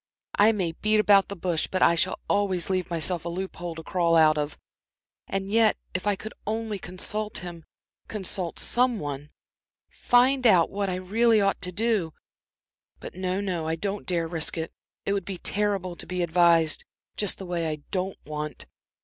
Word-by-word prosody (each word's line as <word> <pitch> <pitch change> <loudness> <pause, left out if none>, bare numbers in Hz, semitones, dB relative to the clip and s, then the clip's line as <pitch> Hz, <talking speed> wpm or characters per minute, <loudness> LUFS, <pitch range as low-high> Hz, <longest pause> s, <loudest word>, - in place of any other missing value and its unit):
I 210 +2 +7
may 185 -6 -1
beat 215 +6 +1
about 200 -2 +5
the 200 - -6
bush, 175 -3 -1
but 185 - +1
I 170 - +6
shall 175 +3 +1
always 190 -3 +1
leave 185 -1 -1
myself 170 0 -1
a 170 - -4
loop 190 +2 -5
hole 175 -2 -5
to 160 - -8
crawl 170 -1 +1
out 155 -1 +6
of. 150 0 -3 0.7
And 195 0 -3
yet 225 0 +4 0.2
if 185 +2 -2
I 205 - +3
could 215 +3 -8
only 220 -1 -2
consult 210 +4 -1
him 170 -2 -8 0.4
consult 190 -4 -4
some 245 -1 +1
one 145 -3 -5 0.6
find 250 +1 +3
out 180 -6 +5
what 200 0 -1
I 180 - -1
really 220 +5 +3
ought 195 -1 +1
to 180 - -2
do. 205 -5 0 0.9
But - - -8
no, 185 +1 -2
no, 175 -5 -2
I 160 - 0
don't 200 +4 -4
dare 170 -2 0
risk 165 0 0
it; 160 0 -3 0.3
it 200 - +1
would 200 -2 -1
be 190 +1 -5
terrible 195 -2 -1
to - - -10
be 180 -1 -1
advised 170 -1 +4 0.3
just 205 -3 0
the 190 - -7
way 170 -2 -1
I 150 -1 -5
don't 190 0 -2
want. 150 0 -5
185 Hz, 185 wpm, -26 LUFS, 170-205 Hz, 0.9 s, I